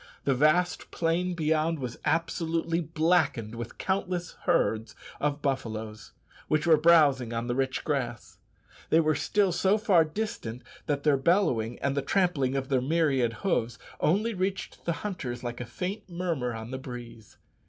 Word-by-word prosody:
The 140 - +2
vast 155 +7 +2
plain 175 +2 0
beyond 160 0 +1
was 125 -4 -6
absolutely 165 +1 0
blackened 160 -8 +1
with 120 0 -7
countless 185 -2 -2
herds 110 +2 +1 0.2
of 145 0 -1
buffaloes, 110 -6 -3 0.3
which 155 +1 +1
were 165 -2 +7
browsing 150 -7 +4
on 115 0 -2
the 120 - -1
rich 130 0 -1
grass. 125 -6 -3 0.5
They 160 - +5
were 155 -1 +3
still 200 +4 +1
so 190 +4 +2
far 195 -6 +4
distant 155 - -4 0.2
that 145 -2 -1
their 150 -2 +4
bellowing, 135 - +1
and 140 0 +1
the 140 - +1
trampling 140 -5 +1
of 135 0 -2
their 130 -2 +2
myriad 135 -5 +1
hoofs, 120 - 0 0.2
only 210 +8 +2
reached 190 0 -3
the 170 - +1
hunters 130 -12 -4
like 120 0 -4
a 120 - -5
faint 185 - -5
murmur 170 -8 -2
on 110 +2 -7
the 130 - -4
breeze. 120 -5 -10
150 Hz, 155 wpm, -28 LUFS, 125-170 Hz, 0.5 s, were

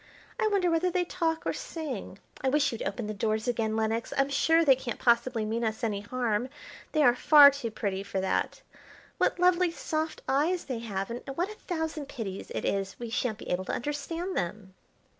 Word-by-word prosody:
I 435 - +3
wonder 390 -4 +2
whether 330 +2 +2
they 360 0 0
talk 330 -2 -1
or - - 0
sing. 275 - -6 0.2
I 265 - +1
wish 290 +1 +2
you'd 230 - -6
open 240 - -3
the 215 - -3
doors 215 +2 -1
again, 225 -2 0
Lenox. 225 +1 -1
I'm 275 0 +3
sure 325 +4 +3
they 270 -3 +7
can't 250 -2 -5
possibly 235 -1 +2
mean 225 +2 -2
us 220 +1 -2
any 210 -3 0
harm; 240 +1 -1 0.4
they 310 -2 +3
are 245 - +6
far 285 +2 +8
too 275 -4 -4
pretty 200 -3 -3
for 195 -1 -3
that. 190 - -1 0.6
What - - +2
lovely 360 0 +4
soft 315 -1 -3
eyes 315 +7 +1
they 255 -4 -3
have, 200 -2 -4
and 240 - -5
what 355 +6 -1
a 425 - -12
thousand 320 -4 -3
pities 200 -7 -6
it - - -2
is 195 -1 -1
we 235 -2 -6
shan't 230 -2 -1
be - - -7
able 180 +1 -1
to - - -3
understand 295 +7 -3
them." 190 +2 -3
250 Hz, 200 wpm, -29 LUFS, 220-320 Hz, 0.6 s, far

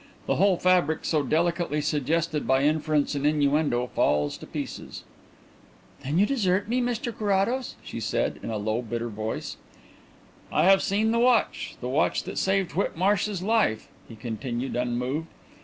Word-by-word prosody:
The - - 0
whole 195 -2 +4
fabric 180 -3 +2
so 155 -2 +2
delicately 170 +1 0
suggested 150 +2 -1
by 130 +1 +3
inference 150 -1 +1
and 140 -1 -2
innuendo 145 -4 +2
falls 75 -10 +1
to - - -10
pieces." - - -6 1.0
"Then 145 +5 -1
you 200 - +5
desert 200 -6 +1
me, 245 +3 +1
Mr 240 -1 -2
Carrados?" 210 +5 0
she - - -6
said, 115 +1 -1
in - - -5
a 110 - -2
low, 110 +3 -1
bitter 120 0 -4
voice. 110 +1 -5 0.9
"I - - +2
have 195 +1 +6
seen 215 +3 +1
the 230 - +2
watch 245 -1 +2
the 125 - -3
watch 135 +4 +1
that - - -4
saved 190 -2 +1
Whitmarsh's 195 +1 0
life," 210 - +1 0.2
he 115 - -9
continued, 120 +3 -4
unmoved. 125 +6 -2
155 Hz, 155 wpm, -26 LUFS, 125-195 Hz, 1.0 s, have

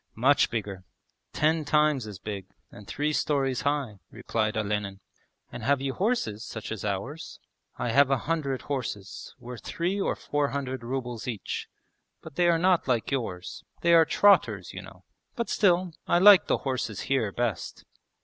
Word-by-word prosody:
'Much 130 +5 +4
bigger; 100 -5 -4 0.5
ten 155 +1 +1
times 150 -5 +2
as 105 -3 -8
big 100 -1 -6 0.2
and 100 - -13
three 150 +1 -1
storeys 135 -4 0
high,' 140 -8 -1
replied 110 -1 -2
Olenin. 105 -2 -2 0.5
'And 120 - -7
have 140 +4 +2
you 135 0 -2
horses 185 - -1
such 110 -3 -7
as 110 - -5
ours?' 105 +11 -4 0.4
'I - - -2
have 140 +3 +5
a 135 - +3
hundred 140 -1 -2
horses, 110 -8 -5
worth 125 -1 -9
three 185 +4 -2
or - - 0
four 145 -1 -1
hundred 130 -3 -4
rubles 125 -1 -4
each, 115 -5 -4 0.6
but - - -10
they 175 +3 +2
are 170 -1 +4
not 180 -1 +2
like 120 -4 0
yours. 110 -10 -4 0.2
They 170 - +4
are 165 -1 +7
trotters, 205 +5 +3
you - - -6
know.... - - -14 0.3
But 235 - -3
still, 180 -3 +2
I - - +4
like 195 +1 +8
the - - +2
horses 125 -6 -3
here 130 -7 0
best.' 115 -5 -3
135 Hz, 165 wpm, -27 LUFS, 110-155 Hz, 0.6 s, like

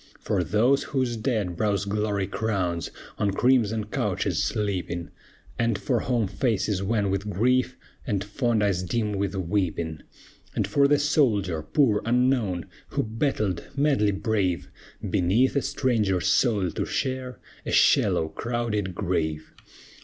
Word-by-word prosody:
For 90 - 0
those 110 - +3 0.2
whose 125 -2 +1
dead 110 -6 -1
brows 100 +1 0
glory 100 -1 -1
crowns, 95 -5 -2 0.3
On 105 - +2
crimson 110 0 +2
couches 105 - -1
sleeping, 90 -5 -2 0.5
And 115 -3 +1
for 125 +1 0
home 120 -2 0
faces 100 -1 0
wan 100 -1 0
with 100 +2 -2
grief, 125 +5 +1 0.3
And 100 -4 0
fond 110 +1 0
eyes 95 -3 +1
dim 105 +4 -1
with 100 0 -2
weeping. 85 -4 -2 0.5
And - - +1
for 140 -1 +3
the 145 +1 +4
soldier, 115 - +1
poor, 105 - +2
unknown, 120 - +1 0.2
Who - - -1
battled, 110 - -1 0.2
madly 140 -7 +3
brave, 100 -3 -1 0.4
Beneath 105 +11 +2
a 140 - +3
stranger 115 -9 +1
soil 100 - +2
to - - -2
share 130 -1 -3 0.3
A - - -4
shallow, 80 - +4
crowded 110 -5 -2
grave. 80 -5 -2
105 Hz, 130 wpm, -25 LUFS, 95-120 Hz, 0.5 s, the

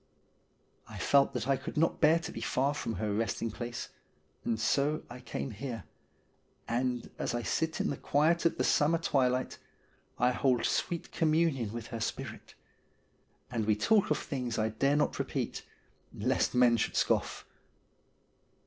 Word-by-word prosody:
I - - -8
felt 140 -1 +3
that 120 0 -2
I 135 - +4
could - - -7
not 165 +2 +2
bear 160 +1 +6
to 165 - -5
be 115 - -7
far 135 +5 +1
from 115 -6 -3
her 105 -2 -2
resting 115 +1 -1
place, 120 +2 -5 0.5
and 115 -2 -1
so 140 +7 +1
I 125 - -8
came 125 +1 -5
here, 115 +2 -5 0.8
and 125 0 -1
as 120 - -1
I 120 - -2
sit 160 +6 -1
in - - 0
the 140 - -4
quiet 160 +4 +2
of - - -3
the - - +1
summer 155 +3 +3
twilight, 130 -5 0 0.6
I 125 +1 +3
hold 125 -1 +2
sweet 170 -2 -1
communion 155 -8 +1
with 115 -1 -6
her 115 - -3
spirit; 110 - -5 1.0
and 115 -3 -1
we 105 - +4
talk 200 - +3
of 150 - +2
things 125 -4 -3
I 110 0 +1
dare 135 +6 +1
not 150 - +1
repeat, - - -2 0.5
lest 125 +3 0
men 125 -1 +5
should - - -1
scoff. - - +1
125 Hz, 160 wpm, -31 LUFS, 115-150 Hz, 1.0 s, bear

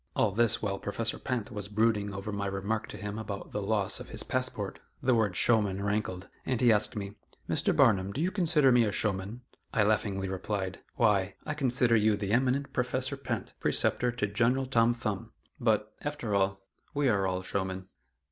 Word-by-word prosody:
All 105 - +3
this 115 +2 +2
while 100 -2 -1
Professor 115 +2 -2
Pinte 125 -5 -3
was 105 -2 -5
brooding 105 -1 +1
over 100 +2 -5
my 100 -1 -2
remark 100 +3 -2
to - - -8
him 105 +1 -5
about 100 -3 -6
the 105 - -2
loss 100 -1 +1
of - - -9
his - - -4
passport; - - -2 0.2
the 130 - +2
word 110 -6 +2
"showman" 100 -4 +2
rankled, 100 -3 -2 0.2
and 130 -3 -1
he 120 -1 +5
asked 105 -1 +1
me: 100 0 -5 0.3
"Mr. - - +1
Barnum, 95 0 +4
do 130 - -5
you 175 +4 +1
consider 165 -8 +3
me 120 -1 +5
a 105 - +1
showman?" 100 +3 -2 0.3
I 110 -5 +3
laughingly 100 -2 +1
replied, 95 0 -3 0.2
"Why, 100 -4 +2
I 155 - -2
consider 125 -4 +2
you 110 -1 +4
the 100 -1 -3
eminent 130 +4 +1
Professor 130 +2 -1
Pinte, 135 - -4
preceptor 125 0 +2
to 120 -3 0
General 120 +6 +1
Tom 120 -2 +3
Thumb; 110 -1 -4 0.3
but, 110 -2 +1
after 145 -8 -3
all, 95 0 +1 0.3
we 145 -1 +2
are 100 -5 +2
all 95 0 -2
showmen." 95 -1 -3
105 Hz, 185 wpm, -30 LUFS, 100-120 Hz, 0.3 s, he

